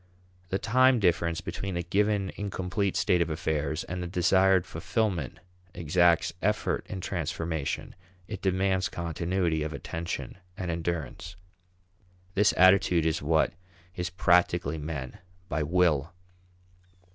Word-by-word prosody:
The 95 - 0
time 130 +4 +4
difference 85 -3 +1
between 95 -2 -4
the 85 - -1
given 100 +1 +1
incomplete 100 -1 -2
state 90 +1 +2
of 85 - +1
affairs 80 -2 -2
and 90 +1 -5
the 90 - -3
desired 95 +1 +3
fulfillment 85 - -2 0.4
exacts 85 +1 +3
effort - - 0
in 95 - -5
transformation, 80 -4 -3 0.3
it - - -6
demands 95 0 +1
continuity 85 0 -1
of 80 +1 -3
attention 85 +2 -5 0.2
and 90 -4 -3
endurance. 85 0 -4 1.0
This 105 +1 +4
attitude 95 -3 +5
is 80 0 0
what 80 +2 +2 0.4
is 90 -1 -2
practically 85 -3 +2
meant 75 -4 -5 0.3
by 75 +2 -1
will. 80 -2 +2
85 Hz, 120 wpm, -28 LUFS, 80-95 Hz, 1.0 s, attitude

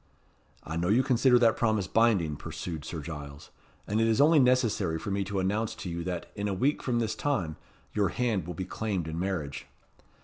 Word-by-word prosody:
"I 80 +1 -5
know 85 +1 0
you 115 +7 +4
consider 125 -1 +4
that 115 -2 +4
promise 110 -4 +1
binding," 95 -7 +2
pursued 80 +1 -6
Sir 80 -1 -5
Giles; 70 -2 -8 0.3
"and 110 +2 0
it 115 - +3
is 110 -1 +2
only 155 +2 +6
necessary 120 -10 +2
for 100 - -5
me 100 0 0
to 100 0 -3
announce 105 +4 -1
to 90 - -6
you 85 0 -3
that, 90 -2 -4
in 100 0 -2
a 100 - -1
week 135 +10 +1
from 125 -2 0
this 115 -2 0
time, 110 - -1 0.4
your 100 -3 +2
hand 110 -5 -1
will 90 - -5
be 95 - -4
claimed 95 -4 -3
in 80 +1 -4
marriage." 85 -7 -3
100 Hz, 205 wpm, -29 LUFS, 85-115 Hz, 0.4 s, only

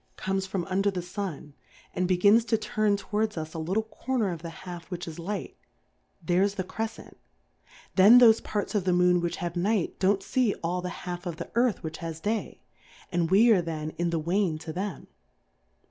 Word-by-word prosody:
47 - - -39
comes 190 0 0
from 190 -2 -2
under 195 +1 +1
the 185 -2 -3
Sun, 175 -6 -6 0.4
and 180 - 0
begins 200 +5 +5
to 225 - +2
turn 215 -1 0
towards 215 0 -2
us 155 0 -5
a 160 - -5
little 190 +7 0
Corner 220 -2 -2
of 165 -2 -6
the 170 - -6 0.2
half 175 -1 -8
which 175 -2 -5
is 165 0 -7
Light, 200 +5 -4 0.7
there's 185 +5 +2
the 190 - -2
Crefcent; 225 +4 -6 0.8
then 205 +6 +8
thofe 225 -2 +7
Parts 205 -1 -3
of 205 -4 0
the 180 - +2
Moon 180 0 +4
which 170 0 -2
have 175 0 -4
Night 195 +1 0
don't 195 +1 +2
fee 245 -3 +1
all 180 +2 -1
the 180 - -4 0.2
half 180 0 -5
of 170 - -3
the - - -8
Earth 235 -4 +1
which 160 0 -5
has 165 -1 -5
Day, 215 +4 -3 0.5
and 170 -2 0
we 220 +6 +6
are 195 -5 +5
then 155 -2 -4
in 170 +2 -2
the 170 - 0
Wane 170 +1 0
to 160 0 -7
them. 190 +1 -4
185 Hz, 200 wpm, -27 LUFS, 170-205 Hz, 0.8 s, then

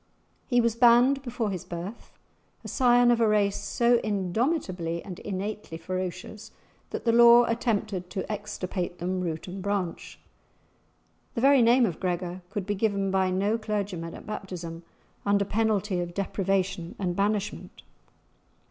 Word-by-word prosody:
He 245 -2 +3
was 230 -1 +1
banned 245 +3 +5
before 240 -5 -3
his 185 -3 -4
birth, 175 +6 -7 0.5
a - - -8
scion 245 -2 +4
of 235 -1 +2
a 225 - +4
race 205 -2 +2
so 240 0 +2
indomitably 190 - -1
and 185 -3 -8
innately 200 -3 -5
ferocious 185 +4 -5 0.4
that - - -5
the 230 - +4
law 235 +1 +8
attempted 215 -6 -1
to 200 +1 -4
extirpate 190 -4 -4
them, 185 +2 -2
root 165 -2 -4
and 190 +1 -6
branch. 200 -3 -3 1.2
The 230 - -1
very 275 0 +6
name 240 +2 +5
of 175 -7 -3
Gregor 180 0 -3
could 205 -2 -4
be 205 - -1
given 200 -1 0
by 190 -1 +2
no 200 +5 0
clergyman 200 -6 -3
at - - -11
baptism, 180 -6 -6 0.4
under 200 0 +2
penalty 210 -3 0
of 175 0 -4
deprivation 195 -3 -1
and 180 -3 -2
banishment. 205 +1 -2
200 Hz, 145 wpm, -27 LUFS, 185-230 Hz, 1.2 s, law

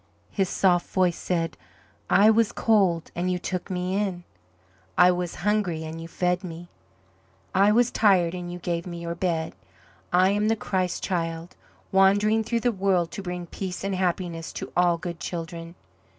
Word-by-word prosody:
His 195 -3 0
soft 175 -2 +2
voice 180 -2 +2
said: 165 -2 -2 0.5
"I 210 +2 +6
was 225 0 +3
cold 190 -7 +2
and 180 +1 -1
you 180 - 0
took 185 +1 -4
Me 180 0 -2
in. 195 -4 -1 0.7
I 180 0 +7
was 180 -1 -3
hungry 200 -6 +1
and 160 +1 -6
you 165 - -7
fed 180 +2 -1
Me. 175 -1 -8 0.8
I 200 +2 +5
was 240 +2 +3
tired 185 -5 +3
and 175 -1 -5
you 175 - -5
gave 170 0 -3
Me 170 -1 -6
your 170 0 -4
bed. 170 -2 -2 0.6
I 185 +2 +4
am 205 +1 +1
the 225 - +3
Christ 185 -4 -2
Child, 165 -2 -3 0.4
wandering 205 +3 +4
through 230 +1 -1
the 245 - +2
world 190 -4 +1
to 200 - -6
bring 180 -2 -5
peace 185 +1 -6
and 195 0 -1
happiness 175 -2 -2
to - - -6
all 175 -1 +3
good 170 -1 -6
children. 170 0 -6
180 Hz, 170 wpm, -25 LUFS, 170-195 Hz, 0.8 s, I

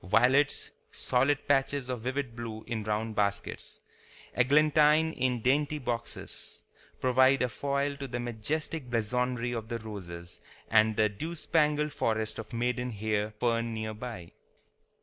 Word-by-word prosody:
Violets, 125 - +3 0.2
solid 135 +3 +1
patches 140 -1 +2
of 125 -3 -3
vivid 130 0 -3
blue 115 -2 -6
in 115 -2 -3
round 110 +1 -2
baskets, 100 -1 -2 0.5
eglantine 150 +4 +4
in 125 -2 0
dainty 145 +3 +2
boxes, 120 -4 -5 0.4
provide 130 +1 +4
a - - +2
foil 140 +3 -1
to 140 -1 -5
the 120 -1 -4
majestic 125 +5 -3
blazonry 125 +1 0
of 115 -2 -4
the 115 - -2
roses 85 -6 -9 0.3
and 110 0 +5
the 110 -1 +5
dewspangled 150 - 0
forest 110 -1 -1
of 110 - -7
maiden 125 +1 -1
hair 105 -1 -1
fern 115 -1 0
near 110 0 -3
by. 110 -6 -7
120 Hz, 130 wpm, -30 LUFS, 110-140 Hz, 0.5 s, and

